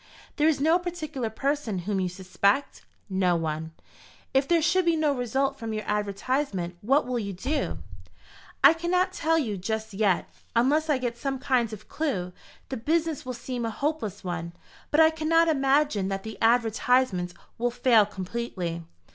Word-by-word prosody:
"There 300 0 +4
is 315 -3 +2
no 320 +5 +4
particular 315 -9 -4
person 275 -2 -1
whom 205 -1 0
you 185 -1 0
suspect?" 200 +7 0 0.2
"No 190 -3 +2
one." 160 -1 -3 0.6
"If 270 +1 +3
there 340 -1 +4
should 335 +4 +3
be 335 -1 +3
no 310 -2 +2
result 270 +2 -1
from 225 -1 -4
your 215 0 -3
advertisement, 205 -2 -1
what 270 +7 +3
will 250 -1 -1
you 200 -3 -4
do?" 265 - -2 0.9
"I - - +9
cannot 360 +3 0
tell 325 -1 +1
you 225 -10 -1
just 220 +3 -3
yet. 195 -3 +1 0.3
Unless 295 +7 +3
I 295 - +3
get 240 -2 -3
some 270 +1 -2
kind 255 -4 +1
of 215 -1 -9
clue, 190 - -2 0.4
the 265 - -3
business 315 +3 -1
will 255 - -3
seem 245 0 -4
a 230 - -1
hopeless 225 - -3
one. 170 -2 -4 0.4
But 305 +1 +4
I 320 0 +6
cannot 325 +1 +3
imagine 275 -8 +2
that 195 0 -3
the 220 0 -8
advertisements 225 -5 +2 0.2
will 245 +1 +2
fail 240 -3 +4
completely. 185 -4 -4
245 Hz, 165 wpm, -27 LUFS, 200-295 Hz, 0.9 s, I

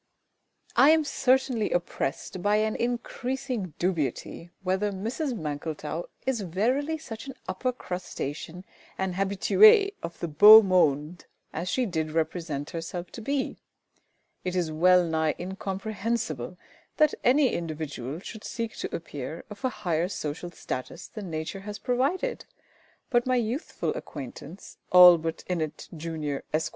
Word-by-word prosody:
I 275 - +7
am 320 0 +5
certainly 260 -5 +1
oppressed 175 0 -2
by 205 +3 +3
an 215 0 +1
increasing 245 - -3
dubiety 170 -1 -2
whether 190 +2 0
Mrs 235 - -3
MANKLETOW 155 +1 -4 0.2
is 260 -4 0
verily 250 - 0
such 235 -5 -8
an 270 - -7
upper 190 +7 -1
crustacean 180 - -6 0.3
and 190 -1 -1
habituée 395 - +5
of 170 - -7
the 170 - -2
beau 210 +8 +10
monde 170 -3 +1 0.3
as 175 +3 -3
she 255 +6 +1
did 160 -6 -2
represent 160 -2 -2
herself 170 +1 -5
to 230 - -8
be. 275 +4 -2 0.8
It 185 0 -2
is 175 -3 0
well 180 +3 +5
nigh 160 -1 0
incomprehensible 195 - -3 0.4
that 305 -1 +4
any 265 +1 +4
individual 155 -5 -4
should 220 +2 -9
seek 230 -1 -4
to - - -4
appear 155 -1 -6
of 210 +5 -10
a 260 - +2
higher 175 -7 -1
social 165 -1 -4
status 130 -6 -6
than 205 -4 -7
Nature 160 +4 -4
has 205 +1 -7
provided; 280 - -1 0.7
but 240 -1 +3
my 255 - +3
youthful 245 +5 -2
acquaintance, 145 +5 -9
ALLBUTT 175 -3 +7
INNETT, 160 -4 -3
Jun., 155 -3 -3
Esq. 155 +1 0
185 Hz, 130 wpm, -27 LUFS, 160-235 Hz, 0.8 s, beau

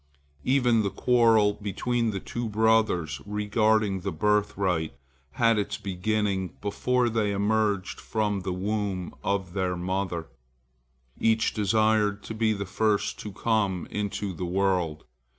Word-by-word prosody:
Even 125 -4 +3
the 100 - 0
quarrel 110 0 +4
between 115 +4 -1
the 100 -2 -3
two 120 +4 -4
brothers 105 -9 +2
regarding 105 -1 +1
the 95 +2 -3
birthright 95 -4 0 0.4
had 115 -2 +3
its 100 - -2
beginning 100 -1 -1
before 125 +5 0
they 110 -2 0
emerged 100 -1 0
from 105 -2 -1
the 95 0 -4
womb 95 -1 -2
of 95 -3 -1
their 90 -2 -1
mother. 90 -2 -2 0.9
Each 110 0 +2
desired 105 0 +2
to - - -6
be 110 0 +1
the 100 -2 -2
first 105 +2 0
to 105 - -6
come 100 -3 0
into 100 -1 -3
the 90 - -6
world. 90 -4 0
105 Hz, 130 wpm, -27 LUFS, 95-110 Hz, 0.9 s, quarrel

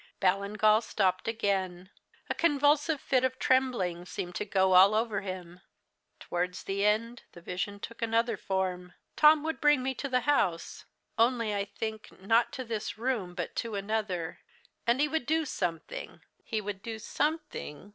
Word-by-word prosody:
Ballingall 205 +3 +3
stopped 185 -4 0
again. 190 -4 -1 0.4
A - - -1
convulsive 295 0 +2
fit 260 -2 +1
of 260 0 0
trembling 245 -11 +1
seemed 180 0 -5
to 210 - -3
go 190 -2 +2
all 190 +3 +7
over 220 -2 0
him. 185 -2 -7 0.6
"Towards 180 +1 -3
the 195 +1 -2
end, 230 +3 +1
the - - -11
vision 185 +3 -4
took 230 +3 -8
another 230 0 +1
form. 185 -2 -2 0.2
Tom 305 0 +6
would 320 +1 -3
bring 295 -3 +4
me 265 +1 -1
to 280 +2 -5
the 255 -1 +2
house 200 -12 0 0.3
only 230 -2 +2
I 200 -1 -1
think, 220 0 -6
not 225 +5 +2
to 260 - -4
this 220 -3 -4
room, 220 -7 -2
but - - -4
to 230 -2 -2
another 200 -4 -2 0.5
and 235 +2 +3
he 295 - +3
would 315 -4 -2
do 320 +1 +2
something 195 - -4 0.2
he 220 -1 -2
would 200 -1 -5
do 225 0 -5
something. 295 - -3
215 Hz, 160 wpm, -30 LUFS, 190-255 Hz, 0.6 s, all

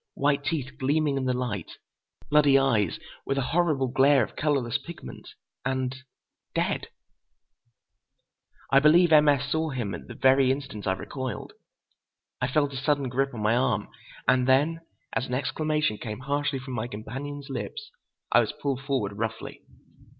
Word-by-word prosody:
White 140 0 +1
teeth 140 -4 -3
gleaming 145 +2 +1
in 135 -1 -1
the 130 - +1
light. 120 -8 -3 0.6
Bloody 145 -2 +6
eyes, 115 -9 +2 0.3
with 135 - -2
a 135 - +1
horrible 155 -6 +2
glare 135 +2 +4
of - - -7
colorless 140 -4 0
pigment. 170 0 -10 0.3
And—dead. 130 0 -4 1.9
I 135 - +8
believe 165 +4 +5
M. 150 -1 +7
S. 140 0 +1
saw 160 0 0
him 120 -8 -3
at 85 - -8
the - - -9
very 135 0 +4
instant 130 -7 -4
I 95 - +3
recoiled. 130 +6 -5 0.9
I 125 - +2
felt 145 +1 +1
a - - -4
sudden 140 -1 0
grip 135 +2 0
on 110 - -4
my 110 +2 +3
arm; 120 -5 +1 0.4
and 125 0 +3
then, 150 +5 +3 0.3
as 125 - -1
an 125 - -2
exclamation 150 -2 0
came 110 0 -6
harshly 140 +1 -1
from 130 0 -7
my 120 -1 -2
companion's 135 +6 -7
lips, 425 - -5 0.4
I - - +6
was - - 0
pulled 135 -2 -2
forward 120 -8 -2
roughly. 115 0 -4
135 Hz, 155 wpm, -27 LUFS, 125-145 Hz, 1.9 s, I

